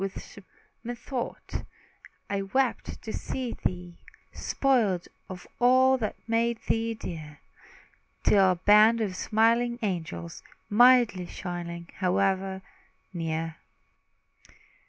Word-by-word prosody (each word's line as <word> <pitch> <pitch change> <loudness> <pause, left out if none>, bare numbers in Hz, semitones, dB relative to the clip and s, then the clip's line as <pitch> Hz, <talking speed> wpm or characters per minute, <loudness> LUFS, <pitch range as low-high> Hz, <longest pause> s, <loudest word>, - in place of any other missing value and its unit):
Then, 195 +1 -7 0.4
methought, 240 +1 -5 0.6
I 200 -1 -1
wept 250 +6 -1
to 220 - -5
see 255 -3 -4
thee 175 -1 -3 0.3
Spoiled 220 -10 +1 0.2
of 185 -1 -8
all 255 +2 +5
that 215 -3 -2
made 230 +1 +1
thee 225 0 0
dear, 155 -7 -8 0.8
Till 195 -2 +5
a - - -5
band 210 +5 +5
of 200 -4 -2
smiling 230 +4 +2
angels 170 -3 -4 0.3
Mildly 240 -5 +5
shining, 170 -2 -6
hovered 190 0 0 0.5
near. 165 -1 -3
200 Hz, 95 wpm, -27 LUFS, 180-235 Hz, 0.8 s, all